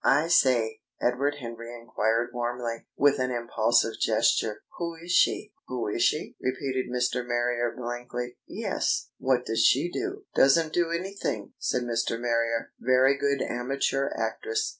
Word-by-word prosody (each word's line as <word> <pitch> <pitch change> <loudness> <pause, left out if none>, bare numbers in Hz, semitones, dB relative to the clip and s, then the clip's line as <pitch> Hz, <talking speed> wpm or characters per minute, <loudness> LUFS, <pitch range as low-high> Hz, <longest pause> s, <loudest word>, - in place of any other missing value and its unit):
"I 150 +5 +3
say," 125 -9 +3 0.2
Edward 135 +4 +1
Henry 115 -1 -7
enquired 115 +1 0
warmly, 120 -1 -3
with 145 0 +4
an 130 0 +1
impulsive 115 -1 +1
gesture, 105 -2 +2 0.2
"who 170 -1 -3
is 170 +2 -7
she?" 210 +3 +3
"Who 125 -3 -3
is 110 - -2
she?" 150 - +1
repeated 130 0 -2
Mr. 125 0 0
Marrier 120 0 0
blankly. 120 0 -5
"Yes. - - -1
What 130 -1 +1
does 115 0 +1
she 145 +7 +4
do?" 390 - -4
"Doesn't 155 +4 +4
do 175 -1 +2
anything," 170 - -3
said 125 - 0
Mr. 115 -1 -1
Marrier. 115 -1 0
"Very 130 +2 +4
good 140 0 0
amateur 135 +2 -1
actress. 110 0 -1
125 Hz, 140 wpm, -27 LUFS, 115-140 Hz, 0.2 s, with